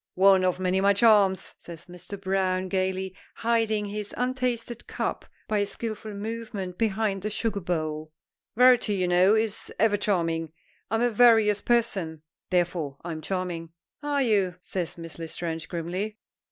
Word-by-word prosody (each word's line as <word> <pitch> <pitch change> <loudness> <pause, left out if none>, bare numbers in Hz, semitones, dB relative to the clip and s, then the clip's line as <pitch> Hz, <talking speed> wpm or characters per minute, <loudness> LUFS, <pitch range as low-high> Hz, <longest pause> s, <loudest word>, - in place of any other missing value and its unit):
"One 190 0 +6
of 185 0 +1
my 185 -1 0
many 195 +2 +4
charms," 200 -4 +4
says 170 -1 -11
Mr. 180 +3 -9
Browne 190 -1 0
gayly, 190 0 -1 0.2
hiding 225 -2 +1
his 205 0 -5
untasted 250 -2 -2
cup - - -3 0.2
by 215 -1 +1
a 205 - +2
skillful 215 -1 -5
movement 205 -4 -5
behind 215 -3 0
the 210 - -2
sugar 215 -1 -1
bowl. 155 -4 -3 0.4
"Variety, 245 -3 +5
you 185 -2 0
know, 180 +4 +5
is 220 -1 -1
ever 210 0 +3
charming. 165 -6 -1 0.4
I'm 225 +3 +1
a 245 - +2
various 220 -3 +5
person, 190 -10 0 0.3
therefore 175 -6 0
I'm 165 -2 -5
charming." 175 -2 -4 0.3
"Are 290 -1 +1
you?" 200 -6 +2
says 175 -3 -4
Miss 165 0 -9
L'Estrange, 165 0 -5
grimly. 185 +5 -3
195 Hz, 145 wpm, -26 LUFS, 175-220 Hz, 0.4 s, One